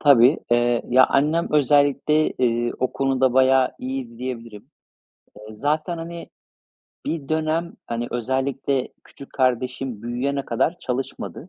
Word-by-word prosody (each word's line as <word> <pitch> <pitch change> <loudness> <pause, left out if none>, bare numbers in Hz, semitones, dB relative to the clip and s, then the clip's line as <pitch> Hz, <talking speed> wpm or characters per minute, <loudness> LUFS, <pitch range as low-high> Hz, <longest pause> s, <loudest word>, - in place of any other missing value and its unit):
Tabii. 140 0 +6
Eee, 120 0 +2
ya, 130 +1 +6
annem 155 +5 +1
özellikle, 145 +1 +3
ııı, 120 -1 +1
o 130 - -1
konuda 135 -1 +1
bayağı 130 0 +4
iyiydi 125 -3 -5
diyebilirim. 115 -4 -7 0.8
Iıı, 110 - -10
zaten, 155 +6 -1
hani, 170 +1 -7 0.8
bir 155 -4 -3
dönem, 160 +2 -1
hani, 120 0 -3
özellikle 130 +2 -1 0.2
küçük 140 - -14
kardeşim 130 -2 -1
büyüyene 135 +4 -2
kadar 150 +9 0
çalışmadı 130 +5 -5
130 Hz, 120 wpm, -22 LUFS, 120-145 Hz, 0.8 s, Tabii